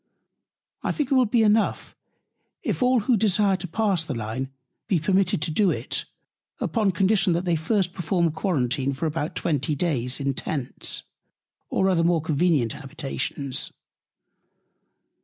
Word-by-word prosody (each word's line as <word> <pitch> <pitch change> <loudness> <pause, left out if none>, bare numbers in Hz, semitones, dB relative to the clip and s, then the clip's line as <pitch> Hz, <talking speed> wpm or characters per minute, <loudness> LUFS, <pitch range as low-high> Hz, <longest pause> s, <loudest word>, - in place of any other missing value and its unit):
I - - 0
think 290 -4 -2
it - - +5
will 255 -3 +4
be 225 +1 +3
enough, 215 0 +1 0.7
if - - -2
all, 250 -1 +4
who 240 +4 +3
desire 205 -2 +3
to 185 0 -6
pass 195 -2 0
the 155 -5 -4
Line, 115 +4 -3 0.4
be 195 -5 +2
permitted 185 0 +1
to 160 - -1
do 195 +4 +3
it, - - -2 0.5
upon 220 -4 +1
Condition 190 0 +3
they 175 0 +1
first 180 +2 0
perform 175 -2 +1
Quarantine 140 -5 0
for 135 +4 -3
about 155 0 -2
20 150 -2 0
Days 135 -6 0
in 140 0 0
Tents, 135 -1 -3 0.7
or 190 - +2
other 180 -3 +3
more 170 0 +3
convenient 155 -5 +1
Habitations. 140 -1 -3
170 Hz, 140 wpm, -25 LUFS, 145-195 Hz, 0.7 s, it